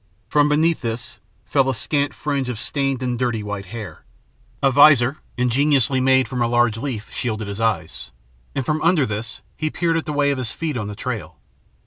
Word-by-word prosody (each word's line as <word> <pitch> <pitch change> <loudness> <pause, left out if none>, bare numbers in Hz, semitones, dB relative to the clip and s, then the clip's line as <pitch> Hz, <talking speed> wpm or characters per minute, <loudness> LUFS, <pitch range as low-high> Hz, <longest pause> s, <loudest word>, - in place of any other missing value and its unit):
From 150 0 +3
beneath 160 +3 +2
this 115 -1 -5 0.3
fell 135 -2 +2
a 130 - 0
scant 145 +4 0
fringe 140 -4 -2
of 125 - -3
stained 135 +1 -1
and 125 -2 -2
dirty 120 -4 -1
white 105 -2 -5
hair. 110 -1 -8 0.6
A 135 - +5
visor, 140 -1 +6 0.2
ingeniously 130 +1 +2
made 130 0 +4
from 125 -2 -3
a 120 - +3
large 120 -2 +2
leaf, 115 -4 -5
shielded 110 -3 -2
his 100 +2 -5
eyes, 110 - -1 0.5
and 135 - -1
from 155 +3 0
under 165 -4 +3
this 110 +1 -5
he 155 0 -2
peered 165 +1 0
at 160 - -3
the - - -1
way 145 0 +2
of 140 - -2
his 125 -3 -2
feet 160 +1 -3
on 105 -4 -3
the 105 - -6
trail. 105 -9 -5
130 Hz, 195 wpm, -21 LUFS, 115-145 Hz, 0.6 s, visor